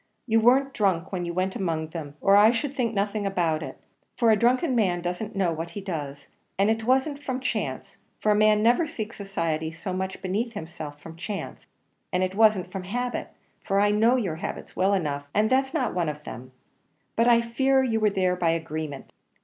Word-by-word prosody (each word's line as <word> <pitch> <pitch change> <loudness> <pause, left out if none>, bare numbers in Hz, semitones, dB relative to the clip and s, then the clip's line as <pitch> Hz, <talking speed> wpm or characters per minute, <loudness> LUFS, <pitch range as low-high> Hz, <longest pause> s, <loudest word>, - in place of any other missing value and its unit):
You 225 -2 +3
weren't 265 +4 +4
drunk 190 -5 0
when 180 -2 -2
you 170 - -4
went 185 +1 -1
among 160 -4 -2
them, 155 -3 -7
or 195 0 +5
I 210 +2 +7
should 270 +4 -1
think 235 -5 -1
nothing 205 +1 0
about 170 -5 0
it - - -7 0.4
for 230 -3 +4
a - - +6
drunken 255 +7 +2
man 185 -6 +2
doesn't 180 +5 -4
know 185 -4 +1
what 165 +1 -5
he - - -1
does; 145 -8 -5 0.3
and 200 +3 +3
it 225 0 -2
wasn't 265 +3 +1
from 260 -2 -2
chance 265 - -3 0.2
for 215 - +2
a - - +4
man 215 0 +4
never 245 +8 +4
seeks 220 -5 -6
society 165 -5 -2
so 180 +4 -5
much 190 0 -3
beneath 215 +6 -2
himself 160 -3 -7
from 165 +2 -11
chance; 200 +4 -6 0.4
and 180 +1 +1
it 185 0 -1
wasn't 205 -4 +3
from 190 -2 -5
habit 245 +5 -3 0.3
for 195 -1 0
I 205 0 +4
know 225 +4 +4
your 190 -11 -1
habits - - -6
well 195 +2 +3
enough, 145 -5 -2
and 215 +2 +2
that's 265 +1 +2
not 305 -6 -1
one 175 -3 0
of 150 0 -7
them; 130 0 -9 0.6
but 230 +1 +3
I 235 -1 +6
fear 265 +3 +2
you 225 -4 +1
were 215 -1 +3
there 185 -2 +1
by 175 -2 +1
agreement. 160 -3 -4
195 Hz, 205 wpm, -26 LUFS, 170-230 Hz, 0.6 s, I